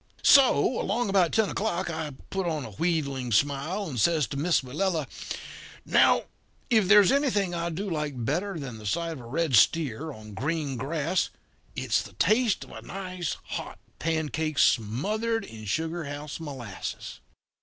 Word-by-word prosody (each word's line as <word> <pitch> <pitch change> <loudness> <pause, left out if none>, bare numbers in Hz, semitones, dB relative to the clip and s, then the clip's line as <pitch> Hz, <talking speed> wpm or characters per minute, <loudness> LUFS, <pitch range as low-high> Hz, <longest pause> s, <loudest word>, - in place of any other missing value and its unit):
"So, 260 -2 +5
along 240 -4 0
about 185 -4 +3
ten 220 -2 +3
o'clock, 190 -3 -1
I 155 -2 -4 0.2
put 190 -2 -1
on 155 -4 -2
a 110 - -8
wheedling 140 - -1
smile 145 - +1
and 125 -7 -2
says 160 0 +3
to - - -5
Miss 165 +4 +2
Willella: 155 +4 -1 0.8
'Now, - - +4 0.5
if 220 -5 +4
there's 205 -1 +7
anything 230 -10 +1
I 170 0 -2
do 185 +5 -4
like 150 -8 -3
better 175 - -1
than 125 -6 -6
the 105 - -7
sight 165 +10 -1
of 160 - -6
a 120 - -10
red 155 +1 +1
steer 150 +5 +3
on 110 -5 -11
green 145 +4 -2
grass 155 +7 -1 0.5
it's - - +1
the - - -11
taste 225 -2 +2
of - - -14
a - - -8
nice 185 -3 -4
hot - - -6 0.2
pancake 160 -1 -1
smothered 210 - +1
in 110 -1 -10
sugar 160 - -2
house 145 +2 -6
molasses.' 130 -10 -6
160 Hz, 160 wpm, -27 LUFS, 140-185 Hz, 0.8 s, there's